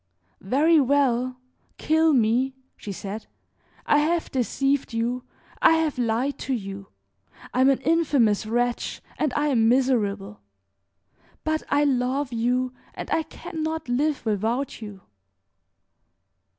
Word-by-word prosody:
"Very 300 - +4
well, 255 -2 +2 0.4
kill 320 +1 +3
me!" 255 +1 +2 0.2
she 205 - -7
said. 200 +3 -6 0.6
"I 295 - +4
have 330 +3 0
deceived 270 +1 0
you, 240 +2 -1 0.4
I - - +7
have 320 -5 0
lied 245 +4 0
to 265 - -1
you, 195 -3 -7 0.7
I 255 - +2
am 265 - +6
an 270 - +2
infamous 280 -11 +2
wretch 240 +2 -1 0.2
and 300 - +1
I 295 0 +1
am 225 -5 +3
miserable; 210 - +1 1.0
but 315 0 0
I 290 +1 +3
love 260 0 0
you, 250 +2 0 0.2
and - - -7
I 325 - +2
can 320 +1 -8
not 315 -1 -3
live 275 +2 0
without 225 +6 -1
you." 205 -3 -9
255 Hz, 125 wpm, -25 LUFS, 230-290 Hz, 1.0 s, I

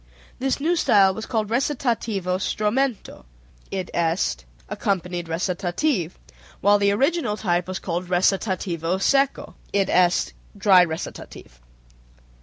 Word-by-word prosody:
This 270 +1 0
new 330 +5 +1
style 195 - +4
was 220 +3 -7
called 220 -4 -1
recitativo 230 -7 -1
stromento 215 +5 -1 0.5
(i.e., 170 - -1 0.2
accompanied 180 -3 -2
recitative), 180 - -1 0.4
while 205 +1 +4
the 200 0 +3
original 275 0 0
type 175 -4 0
was 185 0 -3
called 175 0 -4
recitativo 185 -2 0
secco 275 +7 +1 0.2
(i.e., 185 -2 +2 0.3
dry 195 -2 +6
recitative). 160 - -7
195 Hz, 100 wpm, -23 LUFS, 175-225 Hz, 0.5 s, dry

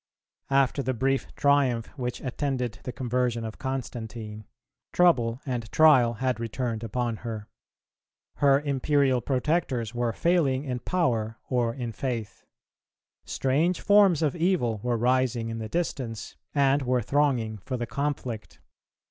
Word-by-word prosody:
After 135 0 +2
the 130 0 -1
brief 135 +3 0
triumph 140 -5 +2
which 125 -3 -4
attended 130 -3 -2
the 125 - -3
conversion 125 -2 -1
of 110 - -7
Constantine, 115 -5 -5 0.5
trouble 125 -9 +3
and 120 -4 -4
trial 135 -7 +6
had 125 +1 -1
returned 115 0 -3
upon 115 0 -2
her. 110 -2 -6 0.9
Her 140 -1 +5
imperial 140 -2 +2
protectors 130 -3 0
were 120 -1 0
failing 145 -4 +1
in 125 -2 -3
power 115 -9 0
or 120 -2 +1
in 120 -3 -4
faith. 115 -1 -4 0.8
Strange 155 +7 +1
forms 200 -6 +5
of 150 0 +1
evil 165 - +1
were 120 0 0
rising 125 -1 +1
in 115 0 -4
the 110 -1 -5
distance 130 -10 -3 0.2
and 140 0 +3
were 125 -2 +1
thronging 125 -6 +1
for 130 +7 -4
the 120 - -2
conflict. 130 -5 -4
125 Hz, 130 wpm, -27 LUFS, 115-140 Hz, 0.9 s, trial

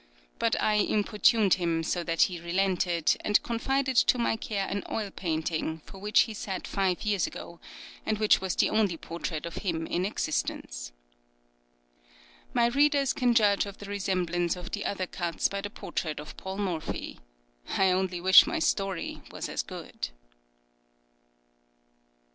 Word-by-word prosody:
But 230 - +1
I 215 - +2
importuned 210 0 +3
him 170 -3 0
so 175 +2 -1
that 165 -1 +3
he 180 -2 -1
relented, 175 -1 +1
and 210 - +4
confided 260 +3 0
to 250 - +5
my 235 -2 +1
care 205 -3 -2
an 200 - -2
oil 210 -3 -3
painting, 160 -2 -2
for 195 - -11
which 210 +2 +4
he 225 - -1
sat 195 -2 -5
five 190 -3 0
years 205 -4 +1
ago, 170 0 -9 0.4
and 215 - 0
which 215 -2 +4
was 190 -1 -2
the - - +2
only 205 -6 +2
portrait 165 -1 -5
of 170 - -6
him 165 -4 -2
in 175 - -1
existence. - - -3 1.6
My 235 - +3
readers 280 +2 +3
can 245 -4 +2
judge 205 -3 +4
of 200 - -9
the 205 - -9
resemblance 180 -3 0
of 180 +2 -8
the 205 - -3
other 190 -2 -2
cuts 175 -2 -1
by 200 0 -4
the 205 - -5
portrait 155 -7 -4
of 150 - -9
Paul 190 +1 -6
Morphy. 180 -6 -3 0.5
I 190 -1 +3
only 185 -1 0
wish 190 +2 +8
my 340 - -1
story 195 - -1
was - - -5
as - - -2
good. - - -6
195 Hz, 155 wpm, -28 LUFS, 170-210 Hz, 1.6 s, wish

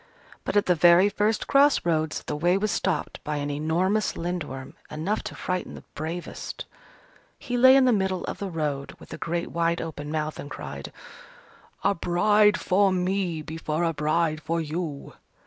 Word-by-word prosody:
But - - 0
at 205 - +3
the 180 - +4
very 175 +4 +6
first 210 +2 0
cross 280 -4 +4
roads, 160 -2 0
the - - -4
way 175 +5 +2
was 210 +1 0
stopped 180 -6 -2
by 150 - -3
an 145 0 -2
enormous 175 +8 0
Lindworm, 150 -7 -4 0.2
enough 165 +8 -2
to - - -6
frighten 185 0 -3
the - - -11
bravest. 165 +3 -6 0.7
He 245 - -4
lay 260 +2 +7
in 270 -1 +6
the 250 - +4
middle 190 -3 0
of - - -5
the 200 - -3
road 150 -5 -3
with - - -12
a - - -7
great 170 0 -2
wide 170 0 +1
open 150 -2 -6
mouth, 155 -1 -2
and 145 - -7
cried, 70 - -7 0.9
"A 200 - +3
bride 210 +4 +3
for 195 +1 +3
me 180 -3 -1
before 160 +1 -3
a 165 -1 +1
bride 155 +1 0
for 165 +2 -1
you!" 155 -2 -4
170 Hz, 175 wpm, -26 LUFS, 155-195 Hz, 0.9 s, lay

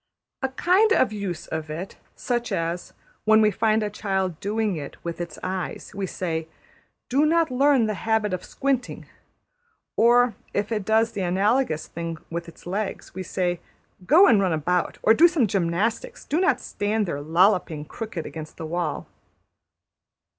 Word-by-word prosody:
A 265 - 0
kind 365 +10 +3
of 260 - +3
use 200 -5 -4
of 160 -1 -5
it, 170 +5 -6 0.2
such 240 -1 -2
as, 170 +1 -2 0.3
when 220 0 +5
we 215 -1 +4
find 220 +2 +1
a 210 - -1
child 190 -5 -2
doing 210 -1 -1
it 145 -3 -7
with 170 0 -4
its 170 - -6
eyes, 185 -2 -4
we 195 -1 -3
say, 165 -3 -3 0.6
``Do 285 +4 +4
not 330 -2 +2
learn 270 -1 +4
the 215 - -1
habit 220 -1 0
of 180 - -3
squinting''; 265 -2 -2 0.9
or 240 +1 +5 0.2
if 205 +2 -1
it 210 -3 -1
does 225 +1 +3
the 200 - -4
analogous 190 - +1
thing 165 -1 -5
with 170 0 -4
its - - -17
legs, 195 +3 -4
we 190 - -5
say, 180 -1 -1 0.4
``Go 340 - +6
and 210 -4 +5
run 185 -3 +1
about, 175 +3 0
or 220 - +6
do 325 +9 +7
some 330 -8 +2
gymnastics; 210 - -1
do 310 - 0
not 380 - +3
stand 210 +1 -1
there 145 -5 -3
lolloping 165 -1 +2
crooked 215 -3 -6
against 155 -1 -8
the 160 - -5
wall.'' 170 -1 -2
200 Hz, 165 wpm, -24 LUFS, 175-230 Hz, 0.9 s, do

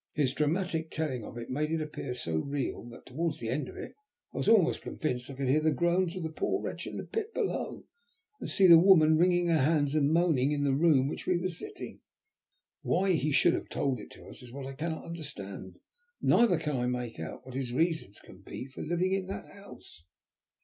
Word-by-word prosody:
His 135 -4 +1
dramatic 160 +2 0
telling 145 -8 -3
of 115 - -9
it 120 +1 -6
made 150 +4 -1
it 165 - +1
appear 150 -4 -5
so 80 -9 -2
real 140 - -3
that 120 - -13
towards 160 +4 -2
the 115 - -5
end 135 +5 -2
of - - -11
it - - -7 0.4
I - - -8
was - - +1
almost 205 -7 +4
convinced 125 -4 -3
that 140 - -7
I - - -12
could 135 -1 -1
hear 140 +4 +4
the 155 - +3
groans 175 +2 +1
of 180 - -4
the 160 - -3
poor - - -1
wretch - - -5
in - - -6
the - - -4
pit 445 0 -4
below, - - -2 0.6
and - - -5
see 195 - +3
the 170 -2 +10
woman 165 -4 +6
wringing 175 +1 +3
her 165 -2 +3
hands 145 0 +2
and 150 -1 +2
moaning 160 -5 +3
in 145 -1 0
the 140 -1 +2
room 150 -1 +4
in 135 - 0
which - - -5
we 180 -1 +3
were 180 +2 -1
sitting. 295 - -8 0.8
Why 190 +1 +1
he 155 -3 +1
should - - +4
have - - -3
told 135 -4 -1
it - - -10
to - - -14
us - - -11
is 125 -1 -12
what 135 +1 -7
I 135 - -6
cannot 160 +3 -4
understand, 105 - -8 0.4
neither 225 -8 +4
can 150 -4 -2
I 125 0 0
make 125 -4 -3
out 80 +9 -7
what 130 - -9
his 130 -2 -3
reasons 160 - 0
can 95 - -15
be 110 - -7
for 130 - -10
living 175 +3 0
in 195 -1 -1
that 195 - -5
house." 200 - -14
155 Hz, 230 wpm, -30 LUFS, 130-170 Hz, 0.8 s, the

